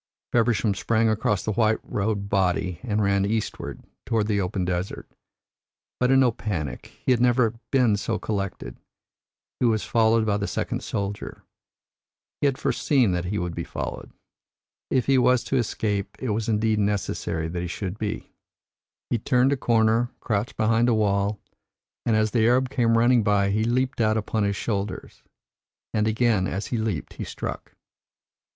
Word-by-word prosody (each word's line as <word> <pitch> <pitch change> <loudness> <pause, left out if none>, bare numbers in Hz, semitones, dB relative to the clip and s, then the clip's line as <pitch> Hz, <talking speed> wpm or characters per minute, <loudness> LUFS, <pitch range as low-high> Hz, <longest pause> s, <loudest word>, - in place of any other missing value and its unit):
Feversham 115 -3 +2
sprang 110 +3 +1
across 105 -2 0
the 110 - 0
white 110 +1 +2
robed 100 -1 -2
body 90 -3 0
and 110 -4 0
ran 100 0 +2
eastward, 110 +2 -3 0.2
toward 110 -2 0
the 105 -2 +1
open 90 0 -2
desert. 90 +1 -3 0.9
But 125 - +2
in 135 0 +5
no 125 -2 +4
panic; 90 - -4 0.2
he - - +3
had 120 -2 +3
never 120 -2 +3 0.2
been 125 -6 +3
so 110 +2 -2
collected. 100 - -4 0.8
He 125 - +3
was 110 -2 +1
followed 115 -1 +3
by 105 -2 +1
the 100 0 -2
second - - -2
soldier. 100 0 -4 1.0
He 145 - +4
had 135 -2 0
foreseen 130 -3 +2
that 90 -1 -1
he 100 +3 -2
would 90 -3 -2
be - - -4
followed. - - -6 0.8
If 130 - +1
he 135 -1 +4
was 125 0 +3
to 135 - 0
escape, 105 -4 -1
it 130 - -4
was 110 +1 -1
indeed 110 0 +1
necessary 95 -5 -1
that 85 +1 -3
he 90 - -3
should 95 +3 -5
be. 105 -2 -4 0.8
He 120 - +1
turned 125 +4 +3
a - - +2
corner, 115 -1 +2
crouched 105 +3 -2
behind 115 +2 +3
a 115 - +3
wall, 100 -1 +1 0.7
and 115 - +3
as 110 0 +2
the 110 0 +3
Arab 125 +2 +2
came 115 -4 +2
running 120 +1 +4
by 100 -2 +2
he 110 +2 +1
leaped 125 +2 0
out 110 0 +3
upon 110 0 -1
his 100 0 0
shoulders. 100 -1 -4 0.7
And 110 0 +1
again 110 -4 +2
as 95 +3 -3
he - - +1
leaped 110 -1 -3
he - - -6
struck." - - -6
110 Hz, 170 wpm, -25 LUFS, 100-120 Hz, 1.0 s, in